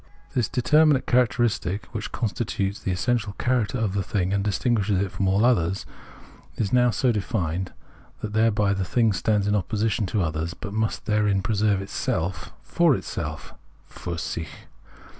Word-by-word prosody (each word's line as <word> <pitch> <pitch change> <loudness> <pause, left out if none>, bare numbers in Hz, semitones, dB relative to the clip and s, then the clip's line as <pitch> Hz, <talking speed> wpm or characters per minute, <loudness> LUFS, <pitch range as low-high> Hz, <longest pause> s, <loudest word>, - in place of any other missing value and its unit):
This 120 -5 +1
determinate 150 +2 +4
characteristic, 120 -5 +1
which 110 -2 -4
constitutes 100 -3 -2
the - - -4
essential 110 +2 0
character 125 +1 0
of 110 -5 -1
the 100 - 0
thing 95 0 -1
and 100 -1 +1
distinguishes 105 -1 +1
it 100 -1 -1
from 95 - -1
all 100 +4 +3
others, 95 -6 +2 0.7
is 105 -1 -2
now 125 -1 +5
so 125 +2 +2
defined 95 -5 -2 0.5
that 105 - -4
thereby 105 -2 +3
the 95 -1 -1
thing 115 +2 +2
stands 100 +2 +1
in 105 - +1
opposition 105 +2 0
to 100 0 0
others, 80 +2 -2
but 100 - -7
must 110 0 -1
therein 105 -2 +2
preserve 105 -2 +1
itself 95 -1 -3
for - - +3
itself - - -5 0.4
{filr 85 - -5
sicli). 80 -1 -4
105 Hz, 155 wpm, -25 LUFS, 95-115 Hz, 0.7 s, now